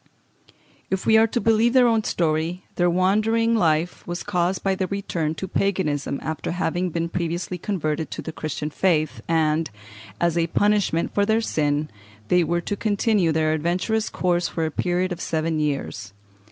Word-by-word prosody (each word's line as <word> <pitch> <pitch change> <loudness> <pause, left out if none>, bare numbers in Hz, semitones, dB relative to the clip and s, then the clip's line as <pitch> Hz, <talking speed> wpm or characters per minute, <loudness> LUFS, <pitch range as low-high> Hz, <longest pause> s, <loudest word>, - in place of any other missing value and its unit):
If 190 0 -2
we 220 - +5
are 220 +1 +6
to 240 - -1
believe 225 +1 +3
their 255 -2 +6
own 225 -2 +3
story, 165 +1 -1
their 175 0 +2
wandering 215 +6 +2
life 170 -4 +1
was 175 0 -4
caused 180 +1 0
by 195 - +2
their 190 -1 -1
return 170 -6 -2
to 190 - -5
Paganism 155 -10 -1
after 160 +3 -3
having 180 +1 -1
been 170 0 -2
previously 170 +1 -3
converted 160 -5 -2
to - - -6
the 160 - -5
Christian 155 -1 -4
faith, 155 -3 +1
and, 160 -1 +1 0.5
as 170 0 +1
a 165 - +1
punishment 205 -2 +1
for 205 - +2
their 220 +2 +2
sin, 150 -7 0 0.4
they 180 -1 +4
were 170 +2 0
to 205 - -3
continue 205 -4 +1
their 155 0 +1
adventurous 180 +8 0
course 175 -1 0
for 165 - -2
a 160 - -2
period 180 +3 0
of 175 -1 -4
seven 160 0 -1
years. 135 -9 -3
175 Hz, 170 wpm, -23 LUFS, 160-200 Hz, 0.5 s, are